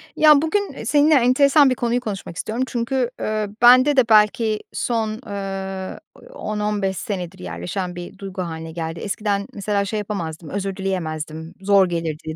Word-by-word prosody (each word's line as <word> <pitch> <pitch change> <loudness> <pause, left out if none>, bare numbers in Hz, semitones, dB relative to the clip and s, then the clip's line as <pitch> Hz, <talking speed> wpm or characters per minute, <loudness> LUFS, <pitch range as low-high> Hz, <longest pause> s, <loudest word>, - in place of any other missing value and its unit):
Ya, 300 -2 +6
bugün, 400 +6 -1
eee, - - -8
seninle 300 +1 +4
enteresan 275 +2 +5
bir 255 - +1
konuyu 240 0 0
konuşmak 200 -7 -6
istiyorum. 230 +7 -2
Çünkü, 245 0 -1
ııı, 215 -1 -1
bende 255 +4 +7
de 245 -3 +4
belki 215 0 +4
son, 220 -2 -1
ııı, 195 -2 -5 0.3
10-15 210 - -2
senedir 185 -7 -5
yerleşen 90 - -5
bir 175 +2 -8
duygu 195 -1 -6
hâline 165 -2 -5
geldi. 165 0 -5
Eskiden 200 -1 -2
mesela 200 -1 -1
şey 215 +2 -2
yapamazdım, 170 -6 -5
özür 195 +1 -3
dileyemezdim, 160 -4 -4
zor 195 -1 +4
gelirdi, 160 -2 -4
200 Hz, 150 wpm, -21 LUFS, 180-235 Hz, 0.3 s, bende